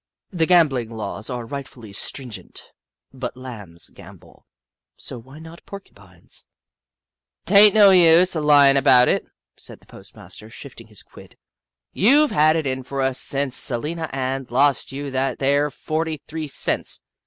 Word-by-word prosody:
The 165 -4 0
gambling 145 -10 +2
laws 110 -2 -6
are 120 -2 -5
rightfully 120 -5 -9
stringent, 125 +2 -5 0.4
but 130 -1 -7
Lambs 105 -10 -9
gam - - -14
bol, - - -22 0.5
so 125 - -8
why 130 +5 -15
not 160 +2 -13
Porcupines? 200 0 -9 0.5
" - - -63
T - - -2
ain't 205 +1 +7
no 205 -2 +7
use 175 0 +5
o' 155 - -1
lyin' 145 -2 +5
about 125 -2 +5
it," - - 0 0.3
said - - -12
the - - -25
postmaster, 110 - -13
shifting 115 -1 -12
his 105 -3 -12
quid, - - -17 0.6
"you 280 +9 +4
've - - -10
had 155 +1 +3
it 160 -2 -2
in 130 -1 -3
fer 135 +2 -5
us - - +1
ever 135 - 0
since 135 0 0
Salina 155 +7 -1
Ann 130 0 -4
lost 140 +2 +1
you 140 +1 -6
that 135 +1 -2
there 140 +2 +1
forty 155 +2 -4
three 155 +2 -7
cents. 140 - -2
140 Hz, 165 wpm, -21 LUFS, 125-160 Hz, 0.6 s, ain't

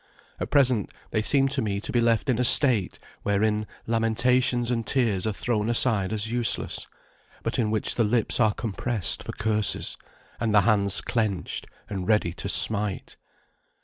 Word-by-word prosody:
At - - -4
present 125 -7 +2 0.2
they 110 - 0
seem 135 +4 +2
to 135 0 -1
me 100 -3 -2
to 125 - -6
be 120 -3 +1
left 115 +2 +1
in 125 -3 0
a - - +2
state, 120 -6 +4 0.2
wherein 105 +1 0 0.2
lamentations 120 +2 +1
and 115 -1 -1
tears 110 -6 0
are - - 0
thrown 110 +1 -2
aside 110 -5 +2
as 110 +1 -3
useless, 120 -3 0 0.6
but - - -2
in 110 -3 0
which 110 0 +1
the 120 - +1
lips 110 +2 +1
are 110 -3 +2
compressed 115 -1 -2
for - - -7
curses, 105 -1 -1 0.4
and 110 -2 0
the 100 - +6
hands 100 -3 +2
clenched 105 -6 -3 0.2
and 95 -3 -5
ready 105 -6 +1
to 100 - -6
smite. 105 -2 +2
110 Hz, 165 wpm, -25 LUFS, 105-120 Hz, 0.6 s, the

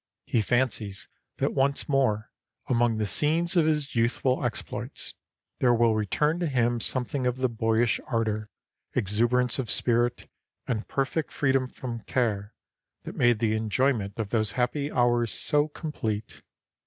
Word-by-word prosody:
He 115 - +1
fancies 110 -3 -1 0.3
that - - 0
once 140 +1 +1
more 130 -7 +1 0.4
among 120 -2 +2
the 110 - 0
scenes 165 - +2
of 165 -3 +4
his 150 -2 0
youthful 125 +3 +1
exploits 120 -2 -4 0.5
there 120 -2 +4
will 115 -1 +3
return 150 - 0
to 175 - 0
him 120 -3 +1
something 130 +3 +1
of 125 0 -1
the 130 0 +1
boyish 115 0 +1
ardor, 110 -3 -1 0.5
exuberance 120 +3 +2
of 125 - -3
spirit 120 0 +1 0.4
and 115 -3 -3
perfect 140 +3 -1
freedom 135 -2 +1
from 120 -2 -6
care 105 -4 -1 0.5
that - - -7
made 120 -2 +3
the 110 -1 +1
enjoyment 110 -1 0
of 110 -3 -3
those 110 -3 0
happy 140 +4 -1
hours 120 -2 +2
so 150 -1 +3
complete. 115 -9 -5
120 Hz, 140 wpm, -27 LUFS, 110-135 Hz, 0.5 s, of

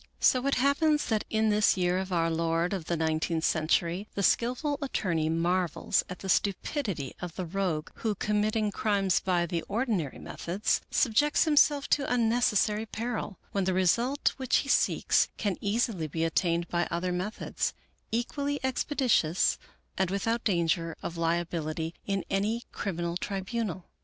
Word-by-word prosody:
So 255 +1 +3
it 275 - +2
happens 295 +3 +2
that 220 -2 0
in 220 0 +2
this 210 -1 +3
year 180 0 +1
of 190 0 -4
our 165 -2 +1
Lord 165 +2 0
of 185 -5 -3
the 170 - -1
nineteenth 160 +1 0
century, 170 +5 +1
the 200 - -1
skillful 255 - +1
attorney 170 - 0
marvels 170 +1 +1
at 180 - -6
the - - -3
stupidity 195 - -1
of 175 -2 -6
the 185 - -3
rogue 170 -3 -2
who, 220 -2 -1
committing 210 +1 0
crimes 200 -3 +1
by 175 -2 +1
the 170 0 -2
ordinary 205 - -1
methods, 190 +5 -2
subjects 290 +4 +3
himself 295 -2 +4
to 280 -3 +1
unnecessary 225 -2 +2
peril, 220 -4 -4
when 195 -2 0
the 185 -1 +1
result 235 +10 +2
which 260 -2 0
he - - -7
seeks - - +3
can 205 -4 -1
easily 205 -5 0
be 160 +2 -2
attained 170 +1 +1
by 175 0 0
other 175 +2 -1
methods, 185 +5 -2 0.4
equally 280 +5 -1
expeditious 255 - +1 0.4
and 190 -2 +2
without 225 +4 -1
danger 170 -4 0
of 170 - -4
liability 165 -1 -1
in 195 -2 -1
any 210 +5 0
criminal 170 -3 -3
tribunal. 195 -1 -3
195 Hz, 150 wpm, -29 LUFS, 170-230 Hz, 0.4 s, himself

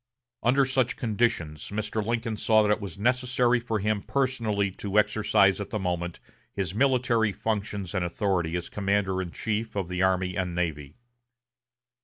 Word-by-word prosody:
Under 135 +3 +4
such 130 -2 +1
conditions, 105 - -1
Mr. 110 +1 -2
Lincoln 115 0 -1
saw 110 0 +3
that 105 - +2
it 105 - +1
was 100 -2 -7
necessary 125 +2 +2
for 115 -2 -2
him 105 0 0
personally 115 -8 0
to 100 +2 -3
exercise 105 -1 +3
at 100 - -5
the 110 - -2
moment 90 -3 -3 0.3
his 95 -2 -3
military 120 -3 +2
functions 100 -2 -3
and 95 -2 0
authority 85 -1 -1
as 85 - -5
commander 100 -2 0
in 90 - -4
chief 110 +4 -3
of 95 -3 -2
the 90 0 -2
army 95 -1 +1
and 90 -2 -2
navy. 75 -5 -3
105 Hz, 160 wpm, -27 LUFS, 95-115 Hz, 0.3 s, Under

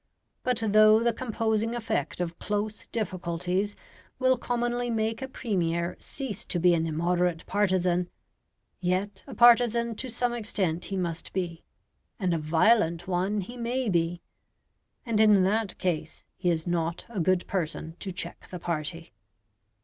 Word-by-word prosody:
But 250 -3 -1
though 215 +1 +6
the 235 -1 +2
composing 225 -1 -1
effect 225 -5 -2
of 170 -1 -3
close 210 0 -3
difficulties 185 -1 -2 0.4
will 260 0 +4
commonly 240 0 -1
make 225 0 -1
a 265 - -3
Premier 175 -9 -1
cease 265 -8 -5
to 175 - -2
be 175 +1 +5
an 165 -1 +1
immoderate 170 +1 0
partisan, 180 -3 +1 0.7
yet 190 +2 -1
a 265 - -8
partisan 235 0 +5
to 260 - -4
some 245 +1 0
extent 195 -7 -1
he 195 - -3
must 170 -3 -3
be, 175 -3 -3 0.6
and 185 -4 +1
a 165 - 0
violent 170 +2 +3
one 190 +3 0
he 240 +7 -8
may 240 +1 -1
be; 170 -1 0 0.8
and 230 -3 0
in 210 -3 +6
that 210 +1 0
case 175 -4 -2
he 180 - 0
is 160 -2 0
not 170 -1 -1
a 230 -4 -5
good 185 +1 +2
person 160 -3 -3
to 195 - -4
check 180 - -6
the 180 - -5
party. 165 0 -4
190 Hz, 150 wpm, -28 LUFS, 175-225 Hz, 0.8 s, though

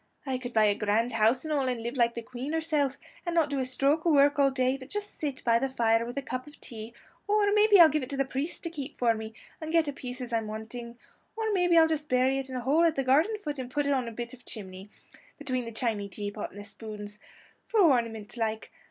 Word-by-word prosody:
I 260 -2 -2
could 250 -1 -6
buy 220 -2 +4
a 205 - +4
grand 215 +4 0
house 225 +5 +3
and 310 - -1
all, 275 -3 +1
and 245 -3 -2
live 235 +2 -4
like 235 -2 +2
the 235 - -5
Queen 255 +6 -6
herself, 305 -4 0 0.3
and 345 -1 -3
not 315 -3 +2
do 280 - 0
a 260 - 0
stroke 275 +5 +1
of 335 - +3
work 285 0 +4
all 275 -1 +5
day, 260 -1 +1
but 265 0 -10
just 415 0 -5
sit 285 -4 -3
by 230 -1 +4
the 270 +2 -1
fire 230 -2 +2
with 245 +3 -7
a 280 - -1
cup 255 +1 -5
of 295 - -15
tea; 225 0 -9 0.3
or 410 -1 +3
maybe 420 -1 +6
I'll 335 - +11
give 305 0 0
it 255 - -6
to 275 - -4
the 275 - +2
priest 270 +5 -4
to 335 - -4
keep 285 -3 -7
for 235 -2 +3
me, 220 0 -7 0.3
and 315 0 -4
get 330 -2 +3
a 285 - -2
piece 250 -1 -7
as 245 -2 -6
I'm 225 -1 0
wanting; 235 +2 -7 0.4
or 440 -1 -1
maybe 355 -3 +3
I'll 325 - +8
just 310 -2 -2
bury 255 +2 +3
it 270 -1 -6
in 260 - -6
a 250 - -2
hole 285 +7 +3
at 330 -2 +3
the 270 - 0
garden 310 +12 +3
foot, 295 -9 -5
and 250 -1 -5
put 290 +2 -1
a - - 0
bit - - +3
on 240 -4 -2
the 240 +2 -7
chimney, 190 -2 -9 0.5
between 255 -4 -3
the 230 - -6
chiney 220 -3 -2
teapot 205 +2 -5
and 205 - -12
the - - -7
spoons 210 0 -9 0.5
for 450 - +1
ornament 230 - +2
like. 220 -1 -2
260 Hz, 265 wpm, -28 LUFS, 230-295 Hz, 0.5 s, I'll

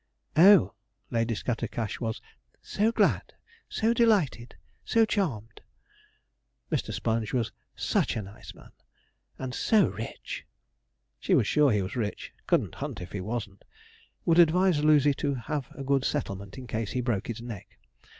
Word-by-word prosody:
'Oh,' 165 - +7 0.4
Lady 115 0 0
Scattercash 115 -1 -3
was 115 -1 -3 0.4
'so 215 +2 0
glad!' - - +1 0.3
'so 225 +2 +1
delighted!' 200 - +2 0.3
'so 225 0 +3
charmed!' 125 - -2 1.1
Mr. - - -1
Sponge 110 -2 -1
was 120 -4 0 0.2
such - - 0
a 110 - -3
nice 100 +2 -11
man, - - -16 0.7
and 130 -1 -5
so 210 - +3
rich. 110 +3 -6 0.8
She - - +2
was - - +3
sure 145 +4 +4
he 105 -3 +1
was 95 - -6
rich 110 -4 -4
couldn't - - +1
hunt - - -4
if 90 - -8
he 100 - -4
wasn't. 105 -1 -5 0.6
Would 170 0 +4
advise 175 -1 +4
Lucy 150 -2 +5
to 140 0 -1
have 130 +2 -4
a 140 - -6
good 135 0 +1
settlement, 100 -9 -3
in 130 - -7
case 110 -2 -3
he 125 - 0
broke 120 -6 -1
his 115 -1 -4
neck. 115 -5 -9
120 Hz, 150 wpm, -28 LUFS, 110-150 Hz, 1.1 s, Oh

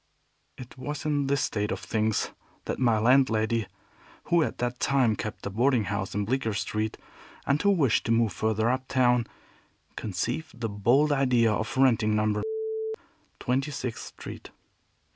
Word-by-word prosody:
It 125 0 -11
was 145 +3 -5
in 145 -2 +1
this 140 -1 +1
state 105 -1 -1
of - - -2
things 110 -1 -1 0.3
that - - -3
my 120 -4 +3
landlady, 115 -2 +3 0.6
who 170 -1 +3
at - - -1
that 120 0 -2
time 130 -5 +2
kept 110 - -6
a 100 - -3
boarding 120 +2 +2
house 100 -1 -3
in 105 0 0
Bleecker 115 -2 -1
Street, 110 0 -2 0.5
and 140 +1 +2
who 200 - +3
wished 150 - +2
to - - +1
move 115 -3 +2
further 110 +2 0
up 130 0 -2
town, 125 -3 +2 0.7
conceived 120 - -4
the 115 -2 -2
bold 120 +9 +3
idea 125 -5 +3
of 110 +4 -3
renting 115 -5 +3
No. 105 0 +1 1.0
Twenty 135 +3 0
sixth 130 -5 -5
Street. - - -10
120 Hz, 155 wpm, -27 LUFS, 110-135 Hz, 1.0 s, my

